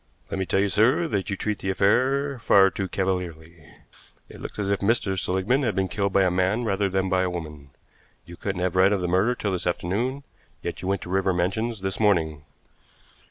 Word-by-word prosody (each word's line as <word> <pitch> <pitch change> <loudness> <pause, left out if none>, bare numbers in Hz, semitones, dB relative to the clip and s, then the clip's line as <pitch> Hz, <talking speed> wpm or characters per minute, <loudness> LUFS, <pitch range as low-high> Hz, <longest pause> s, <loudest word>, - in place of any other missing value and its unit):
"Let 95 - -2
me 95 - -2
tell 95 - +1
you, 100 - +2
sir, 130 - +3
that 100 -7 -2
you 100 - -2
treat 105 -1 -2
the 95 - -3
affair 130 +8 +2
far 95 -4 +5
too 95 - -3
cavalierly. 85 -4 -4 0.6
It - - -12
looks - - -8
as 100 -1 -1
if 100 - +1
Mr. 100 -2 +1
Seligmann 95 +8 0
had 115 -6 0
been 95 -1 +1
killed 100 +1 -1
by 95 0 +4
a 90 - +2
man 95 +6 +1
rather 100 -2 0
than 95 0 0
by 95 0 +2
a 95 - 0
woman. 75 -5 -7 0.6
You 85 - -11
couldn't 95 0 -4
have 90 -1 -1
read 95 +2 +5
of 100 - 0
the 90 - -1
murder 95 +8 +2
till 105 -4 -2
this 90 -1 -2
afternoon, 115 +11 -2 0.4
yet - - -4
you 95 - -5
went 95 -1 -1
to - - -9
River 95 0 +1
Mansions 100 +5 -1
this 95 0 -3
morning." 80 -8 +1
95 Hz, 215 wpm, -25 LUFS, 90-105 Hz, 0.6 s, far